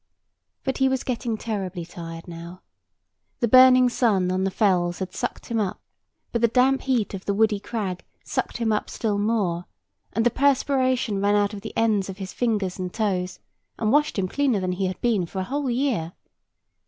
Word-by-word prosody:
But 265 0 -2
he 265 0 +4
was 265 -1 -1
getting 235 -3 -2
terribly 190 -6 -4
tired 165 0 -8
now. 170 +1 -9 0.8
The 240 - +2
burning 255 +1 +7
sun 205 -7 +2
on 185 +1 0
the - - +1
fells 180 -4 +1
had 190 -1 -5
sucked 245 - -4
him 230 -1 -1
up; 200 -3 -2 0.5
but 235 - -1
the 235 - +5
damp 260 +3 +3
heat 245 -7 0
of 195 -1 -6
the 200 - 0
woody 215 -1 +3
crag 200 -4 -4 0.2
sucked - - -2
him 230 -2 0
up 210 - -1
still 210 -3 -1
more; 200 -5 0 0.5
and 225 +3 +1
the 240 - +4
perspiration 260 -5 +1
ran 205 +1 +3
out 205 0 +2
of 200 - -7
the 220 - -8
ends 215 -4 +2
of 190 - -6
his 190 -2 -6
fingers 205 -6 -1
and 180 -1 -3
toes, 185 -4 -1 0.4
and 215 - 0
washed 295 -1 +2
him 190 -1 +1
cleaner 265 0 +1
than 185 -1 -1
he 185 +1 -1
had 185 - -5
been 215 -8 +1
for 190 - -9
a 190 - 0
whole 275 +6 -2
year. 235 - 0
210 Hz, 195 wpm, -24 LUFS, 185-245 Hz, 0.8 s, burning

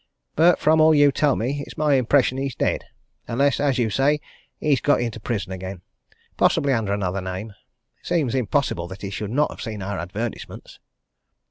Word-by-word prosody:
But, 170 +3 +5
from 155 +1 +3
all 155 0 +6
you 145 -1 +5
tell 145 +1 +2
me, 140 +5 -2
it's - - -12
my 150 -1 +2
impression 130 0 +2
he's 135 -2 -3
dead - - -1 0.4
unless, 140 +4 +1
as 140 -3 +1
you 115 -3 +1
say, 145 +6 +2 0.4
he's 145 -5 +1
got 145 - +3
into 115 -2 -3
prison 105 -4 -3
again 95 -1 -7 0.5
possibly 140 -1 +3
under 110 -5 -1
another 95 -1 -1
name. 95 +4 -5 0.5
It - - -15
seems 160 -9 +1
impossible 130 -8 0
that 95 +3 -10
he 100 - -4
should 105 0 -4
not 145 +6 +1
have - - -10
seen 110 -4 -5
our 100 -1 -3
advertisements." 105 +7 -6
120 Hz, 180 wpm, -23 LUFS, 100-145 Hz, 0.5 s, all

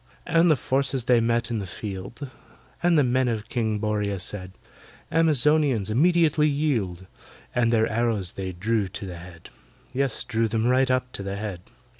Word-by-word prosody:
And 170 +1 +4
the 155 - +5
forces 135 -1 0
they 120 0 +4
met 115 0 0
in 115 - -1
the 100 - -5
field:— 105 +8 -7 0.5
And 175 -1 +3
the 145 - +5
men 130 +1 +2
of 110 -1 -3
KING 110 -3 -1
BORRIA 105 -2 -1
said, 95 -1 -6 0.6
"Amazonians, 150 -8 +3
immediately 155 +2 +3
yield!" 115 - -1 0.5
And 115 -1 +2
their 110 -1 +3
arrows 110 -5 -1
they 95 -1 -4
drew 105 +3 -1
to 95 +2 -7
the 90 -2 -7
head— 85 -1 -12 0.4
Yes, 135 -2 0
drew 115 -1 0
them 110 +1 -1
right 130 +1 +3
up 130 0 0
to - - -6
the 100 0 -4
head. 100 -4 -5
115 Hz, 170 wpm, -25 LUFS, 100-135 Hz, 0.6 s, the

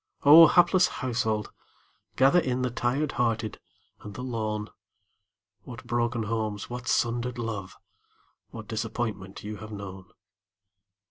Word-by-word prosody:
Oh, 160 +3 +10
hapless 180 +2 +4
household, 110 -4 -2 0.6
gather 135 +7 +5
in 130 -5 -1
The 125 - -1
tired 130 +5 -1
hearted 115 -3 -1 0.4
and 105 -1 -10
the 125 - -6
lone! 110 -4 -3 0.9
What 115 +2 -11
broken 120 -1 -1
homes, 110 -1 -3
what 125 0 -6
sundered 120 +1 0
love, 110 -5 -5 0.7
What 110 -2 -9
disappointment 110 -3 -4
you 105 +1 -6
have 110 +2 -10
known! 95 -3 -8
115 Hz, 120 wpm, -27 LUFS, 105-125 Hz, 0.9 s, Oh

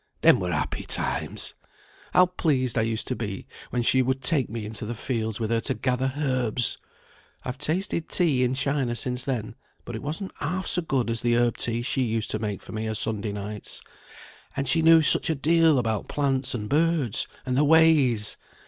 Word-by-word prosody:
Them - - +6
were 90 -1 -2
happy 75 -3 -2
times! - - -2 0.6
How 180 - +6
pleased 140 -9 0
I 115 - +2
used 110 0 -1
to 130 - -1
be 100 -5 -5 0.2
when 120 -1 -1
she 130 +2 +4
would 130 +1 -1
take 135 -1 +2
me 110 -1 -5
into 110 +1 -5
the 115 +3 -4
fields 110 -3 -3
with 110 -1 -2
her 115 - +2
to - - -1
gather 130 +3 -1
herbs! 130 -5 0 0.7
I've 125 +1 -5
tasted 170 +2 -2
tea 150 -8 +2
in 125 +1 +1
China 135 -2 0
since 125 0 -3
then, 115 -5 -3 0.3
but 120 - -7
it 110 - -5
wasn't 160 +7 -5
half 180 +6 -2
so 180 - 0
good 135 -8 -1
as 115 - -1
the 120 0 +2
herb 120 -1 +2
tea 120 0 -1
she 135 +1 0
used 115 -3 -1
to 110 - -1
make 105 -3 -4
for - - -11
me 110 0 -3
o' - - -2
Sunday 105 -1 0
nights. 105 +1 -5 0.7
And 140 0 -1
she 165 +6 +4
knew 165 0 +6
such 155 - +2
a 160 - +1
deal 160 +1 +4
about 110 -3 -1
plants 135 -3 0
and 105 -3 -4
birds, 155 -5 +2 0.2
and 130 -1 -1
their 140 - +3
ways! 145 -8 +4
125 Hz, 200 wpm, -25 LUFS, 110-145 Hz, 0.7 s, Them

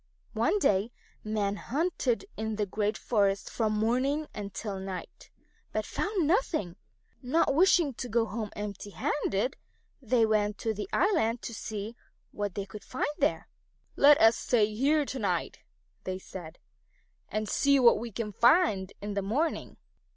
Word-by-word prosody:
One - - +2
day 205 - +2 0.3
men 210 -2 -1
hunted 285 - -1
in 220 0 -3
the 210 0 0
great 210 +2 -1
forest 200 -4 0
from 220 -2 0
morning 255 +8 +1
until 200 0 -5
night, 190 -1 -7 0.4
but - - -2
found 400 -6 -1
nothing. 310 - 0 0.5
Not 275 +3 +2
wishing 335 -2 +4
to 245 +1 -6
go 230 0 +2
home 215 0 -4
empty 205 0 -6
handed, 230 0 -1 0.4
they 240 -2 +3
went 210 -1 +1
to 225 - -1
the 205 -2 -5
island 285 - +1
to 230 - -5
see 220 0 -5 0.4
what 205 -2 -4
they 200 - -3
could 205 +1 -10
find 255 - -2
there. - - +1 0.5
"Let 290 0 +7
us 225 +1 +6
stay 215 -3 +1
here 285 +6 +2
to 265 - -5
night," 205 - -1 0.4
they 185 0 -3
said, 180 -3 -9 0.7
"and 215 0 -2
see 280 +5 +3
what 235 -4 +6
we 235 +1 -6
can 215 0 -4
find 215 - +3
in 205 0 -3
the 200 - -1
morning." 270 +12 -2
220 Hz, 150 wpm, -29 LUFS, 205-270 Hz, 0.7 s, Let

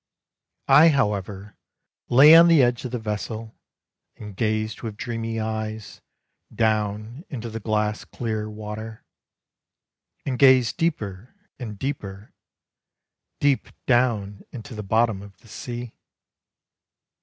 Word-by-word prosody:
I 150 +4 +7
however 105 - -2 0.5
lay 145 +6 +8
on 170 +1 +9
the 165 -5 +6
edge 120 +1 0
of - - -3
the 125 - -2
vessel, 110 0 -5 0.6
And 105 -2 -10
gazed 110 +1 -1
with 110 -3 -6
dreamy 115 -1 -4
eyes 110 -1 -5 0.5
Down 110 +4 -1
into 120 -4 -6
the 115 - -5
glass 105 -1 -1
clear 110 -2 -4
water. 110 +1 -8 1.2
And 130 -3 -3
gazed 130 -4 +5
deeper 115 - -3 0.2
and 110 -5 -7
deeper, 105 -6 -6 1.1
Deep 140 -2 +1 0.2
down 110 -6 +1
into 125 +2 -9
the 105 - -5
bottom 110 0 +1
of 100 -1 -13
the 120 - -22
sea. 120 +1 -7
110 Hz, 115 wpm, -24 LUFS, 105-125 Hz, 1.2 s, on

